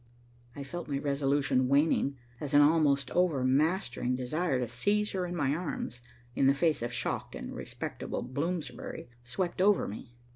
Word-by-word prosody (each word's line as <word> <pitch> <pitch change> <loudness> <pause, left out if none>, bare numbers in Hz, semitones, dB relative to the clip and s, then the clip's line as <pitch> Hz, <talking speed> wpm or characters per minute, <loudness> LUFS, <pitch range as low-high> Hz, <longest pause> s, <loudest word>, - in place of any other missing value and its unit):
I 140 - -5
felt 175 +6 -6
my 140 -2 -1
resolution 140 -2 +1
waning, 140 0 +2 0.2
as 145 -1 -2
an 145 - +8
almost 145 -2 +3
overmastering 145 -4 +1
desire 135 +4 0
to 125 - -1
seize 205 - +1
her 185 -2 -2
in 175 - -4
my 145 -4 +1
arms, 150 -7 -4 0.3
in 135 - +3
the 140 - +5
face 155 0 +2
of 120 +1 -2
shocked 120 - -2
and - - -6
respectable - - -5
Bloomsbury, 150 +2 -4
swept 175 +9 -2
over 200 0 +4
me. 115 +3 -8
145 Hz, 155 wpm, -30 LUFS, 130-170 Hz, 0.3 s, an